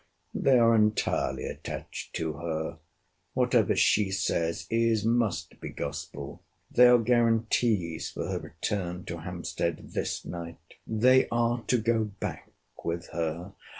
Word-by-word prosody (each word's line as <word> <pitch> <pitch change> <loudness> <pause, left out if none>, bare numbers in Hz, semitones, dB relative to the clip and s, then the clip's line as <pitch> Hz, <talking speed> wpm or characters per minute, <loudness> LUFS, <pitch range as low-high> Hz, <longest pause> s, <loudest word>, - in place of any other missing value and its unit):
They 135 -2 +4
are 115 -1 +5
entirely 105 -1 +1
attached - - -6
to 80 -1 -2
her. 80 0 -4 0.6
Whatever 125 -4 +3
she 105 -2 +3
says, 90 -3 -1
is, 115 -2 +2
must 115 -4 0
be, - - -5
gospel! 70 -1 -6 0.3
They 125 0 +7
are 125 0 +7
guarantees 115 -6 +1
for - - -5
her - - -2
return 90 +1 -4
to 85 - -5
Hampstead 85 -1 -4
this - - -2
night. 85 -1 -6 0.3
They 125 +4 +4
are 120 0 +1
to 125 - +3
go 115 -1 +1
back - - -5 0.3
with 85 +1 -3
her. 85 +3 -3
105 Hz, 130 wpm, -28 LUFS, 85-115 Hz, 0.6 s, They